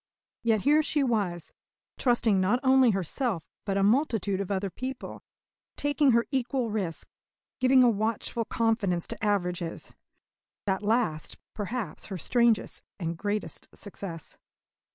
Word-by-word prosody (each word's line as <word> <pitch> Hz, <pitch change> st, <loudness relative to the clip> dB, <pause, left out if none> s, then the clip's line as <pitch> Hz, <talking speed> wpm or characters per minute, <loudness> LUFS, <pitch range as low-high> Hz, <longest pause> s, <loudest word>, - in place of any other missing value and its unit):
Yet 225 Hz, -3 st, +2 dB
here 300 Hz, +5 st, +5 dB
she 300 Hz, -1 st, +1 dB
was, 200 Hz, -9 st, -1 dB, 0.5 s
trusting 235 Hz, -6 st, +3 dB
not 210 Hz, +7 st, +2 dB
only 260 Hz, -1 st, +6 dB
herself 195 Hz, -, -1 dB, 0.2 s
but 195 Hz, -1 st, 0 dB
a 195 Hz, -, +2 dB
multitude 215 Hz, -, +2 dB
of 195 Hz, -, -4 dB
other 195 Hz, -1 st, -1 dB
people; 255 Hz, +4 st, -6 dB, 0.6 s
taking 290 Hz, 0 st, +2 dB
her 235 Hz, 0 st, +3 dB
equal 255 Hz, -3 st, 0 dB
risk; 190 Hz, -6 st, -2 dB, 0.5 s
giving 255 Hz, 0 st, +6 dB
a -, -, +6 dB
watchful 220 Hz, +2 st, -1 dB
confidence 215 Hz, -8 st, 0 dB
to -, -, -6 dB
averages 180 Hz, -5 st, -1 dB, 0.7 s
that 190 Hz, -1 st, 0 dB
last, 210 Hz, -8 st, 0 dB, 0.2 s
perhaps, 210 Hz, -4 st, -4 dB
her 195 Hz, -, -5 dB
strangest 235 Hz, -, +2 dB, 0.2 s
and 165 Hz, -2 st, -2 dB
greatest 205 Hz, +4 st, -3 dB
success. 185 Hz, -5 st, -8 dB
215 Hz, 130 wpm, -28 LUFS, 190-245 Hz, 0.7 s, only